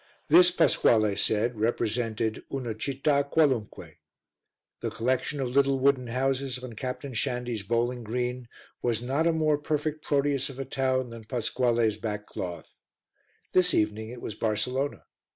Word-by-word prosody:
This, 175 +3 +8
Pasquale 110 - +3
said, 110 +3 +1
represented 115 0 -1
"una 125 -5 -3
citta 140 +5 0
qualunque." 130 -9 0 0.8
The - - -2
collection 130 +4 -1
of 130 -2 -1
little 135 +1 +3
wooden 130 -2 +2
houses 130 +1 -1
on 125 -2 -8
Captain 130 +3 -5
Shandy's 120 -1 -2
bowling 120 +3 -1
green 125 +2 -3 0.3
was 120 -1 0
not 140 +6 +1
a - - +4
more 155 -2 +2
perfect 150 +1 -2
Proteus 140 -1 +1
of 135 - -9
a 135 - -4
town 130 -1 0
than 115 -1 -10
Pasquale's 120 -2 +1
back 105 -2 -4
cloth. 90 -2 -7 0.7
This 180 -1 +4
evening 110 +1 0
it 120 0 -9
was - - -4
Barcelona. 115 +7 -1
125 Hz, 140 wpm, -27 LUFS, 115-140 Hz, 0.8 s, This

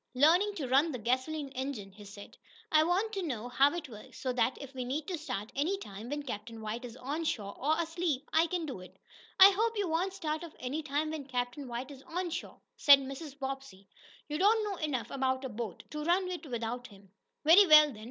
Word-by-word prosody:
"Learning 350 +10 +4
to 290 -8 -3
run 275 +6 +3
the 255 - -4
gasoline 260 +6 -1
engine," 260 -7 -5
he 205 +2 -13
said. 200 0 -11 0.4
"I 310 0 +6
want 380 +7 0
to 390 - -2
know 245 -8 -4
how 275 +3 +4
it 335 -4 -5
works 215 -4 -12
so 255 -1 -2
that 250 +1 +1
if 275 -1 -9
we 255 -1 -4
need 285 +5 -3
to 365 - -1
start 255 -9 -5
any 320 +8 0
time 215 - -9
when 290 +1 -3
Captain 225 -2 -6
White 220 +3 -5
is 240 0 -9
on 290 +6 -3
shore, 215 -11 -3
or 305 +5 0
asleep, 325 -4 -1
I 325 +1 +4
can 345 -1 -2
do 270 -10 -6
it." 185 - -13 0.4
"I 385 +1 +11
hope 445 +3 0
you 405 -2 0
won't 350 +4 0
start 315 -3 -3
off 335 - -10
any 270 +5 -3
time 300 +1 -1
when 300 -4 -6
Captain 250 +1 -3
White 245 +3 -5
is 270 -2 -11
on 350 +1 -3
shore," - - -6 0.2
said 285 -1 +8
Mrs. 275 +2 -7
Bobbsey. 270 -8 -6 0.4
"You 300 +1 -3
don't 430 +3 +4
know 405 -3 -3
enough 290 -7 -2
about 260 0 -1
a - - -3
boat 220 -4 -6
to 300 0 -4
run 360 +3 +2
it 345 -3 -6
without 240 0 -4
him." 195 -3 -18 0.3
"Very 365 +6 +8
well, 305 -2 +8
then. 215 - -12
280 Hz, 225 wpm, -31 LUFS, 245-325 Hz, 0.4 s, I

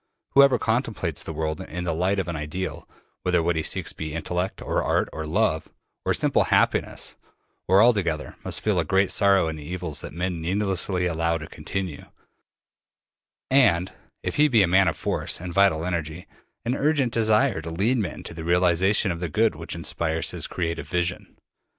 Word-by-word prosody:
Whoever 140 -2 +6
contemplates 110 - -1
the - - -6
world 80 0 -3
in 90 +2 -5
the 85 -2 -1
light 90 +5 +1
of 95 -3 -1
an 85 - -3
ideal 80 +5 -5 0.3
whether 90 -2 +1
what 85 0 +1
he 80 - 0
seeks - - -1
be 80 0 -5
intellect, 90 +3 -2
or - - -1
art, - - +1
or 80 0 -5
love, 80 -2 0 0.4
or - - +2
simple - - +2
happiness, - - +1 0.5
or 95 +3 +6
all 120 +2 +6
together 85 -7 -2
must - - -4
feel 105 -4 +1
a - - +2
great 95 +4 +2
sorrow 100 -3 +4
in 80 0 -4
the 75 - -9
evils 85 -2 -4
that - - -7
men 85 0 -3
needlessly 95 0 0
allow 85 -1 0
to 80 - -7
continue, 90 -5 -5 1.5
and 95 -10 +4 0.3
if - - -3
he 150 +1 +6
be 115 -7 +4
a - - +2
man 95 +1 +4
of 85 - 0
force - - -2
and 90 0 -6
vital 95 -4 +3
energy 85 -1 -3 0.4
an 120 - 0
urgent 140 -4 +1
desire 110 -2 +3
to 80 - -6
lead 105 +10 +1
men 100 - -4
to - - -7
the 80 0 -7
realization 90 +4 +3
of 85 - -4
the 90 -1 -3
good 110 +5 +2
which 80 +2 -6
inspires 80 0 -1
his - - -4
creative 85 -2 -3
vision. 90 -1 -2
90 Hz, 185 wpm, -25 LUFS, 80-100 Hz, 1.5 s, Whoever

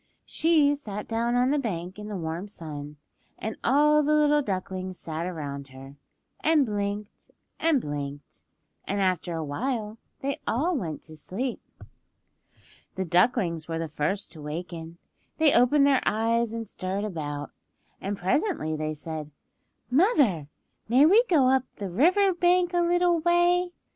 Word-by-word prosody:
She 310 -3 +3
sat 210 -8 -6
down 235 +1 0
on 250 +2 +3
the 295 - +2
bank 185 -5 -4
in 210 - -7
the 210 -2 -4
warm 165 +3 -4
sun, 150 -6 -8 0.4
and 220 0 -4
all 300 +4 +4
the 300 +1 +2
little 295 0 +4
ducklings 185 -4 -4
sat 165 +1 -4
around 140 -5 -5
her, 135 +1 -12 0.4
and 310 -3 +3
blinked 205 -1 -4 0.3
and 320 -4 +3
blinked, 145 - -6 0.4
and 200 +1 -2
after 180 -3 0
a 160 - -2
while 220 - -3 0.2
they 280 +2 -2
all 320 +10 +1
went 165 - -4
to 155 - -12
sleep. 230 - -4 1.3
The 190 - -2
ducklings 175 -3 +2
were 165 -1 -3
the 165 0 -3
first 155 +6 -2
to 160 - -10
waken. 165 +2 -6 0.4
They 315 -2 +5
opened 275 +4 +5
their 275 -2 +4
eyes 230 +1 +1
and 230 -1 -5
stirred 190 +2 -3
about, 145 -7 -4 0.5
and 200 +1 -3
presently 185 - 0
they 155 0 -3
said, 155 0 -6 0.6
"Mother, 260 - +3 0.4
may 260 +5 +6
we 415 +9 +6
go 295 -8 +4
up 260 0 +3
the 195 -3 -5
river 365 - +4
bank 355 0 +2
a 350 - +3
little 350 0 +3
way?" 350 +2 +3
210 Hz, 150 wpm, -26 LUFS, -, 1.3 s, may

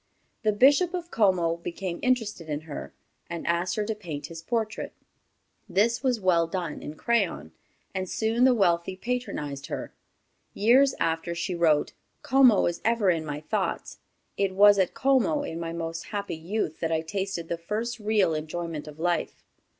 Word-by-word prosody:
The 215 -2 +2
Bishop 285 - +4
of 345 -1 -5
Como 180 -6 +2
became 175 +1 -5
interested 225 -10 0
in 150 0 -2
her, 155 -2 -7 0.4
and 170 -1 -5
asked 175 +1 0
her 215 - 0
to 220 - -1
paint 160 -9 -6
his 165 - -8
portrait. 220 +3 -2 0.8
This 230 +4 +2
was 255 -4 +1
well 175 -4 +3
done 170 -3 -4
in 150 - -7
crayon, 195 - 0 0.4
and 185 -1 -3
soon 225 +2 +1
the 255 -1 +6
wealthy 175 -3 +2
patronized 185 - -4
her. - - -5 0.6
Years 260 +6 +5
after, 165 +1 -1
she 170 +2 -2
wrote: 160 -4 +2 0.3
"Como 255 -5 +5
is 175 0 -2
ever 225 -4 +3
in 165 -2 -1
my 145 0 -4
thoughts. 200 +5 -3 0.4
It 195 -1 0
was 205 0 +7
at 185 - +1
Como, 275 +3 +2
in 165 - -5
my 165 -1 -4
most 165 0 -4
happy 200 -1 -4
youth, 165 0 -3
that 165 - -1
I 160 -1 +1
tasted 190 0 -3
the 170 0 -3
first 225 +7 -3
real 210 -5 +2
enjoyment 155 0 -4
of 150 0 -10
life." 175 +1 -1
185 Hz, 165 wpm, -27 LUFS, 165-225 Hz, 0.8 s, was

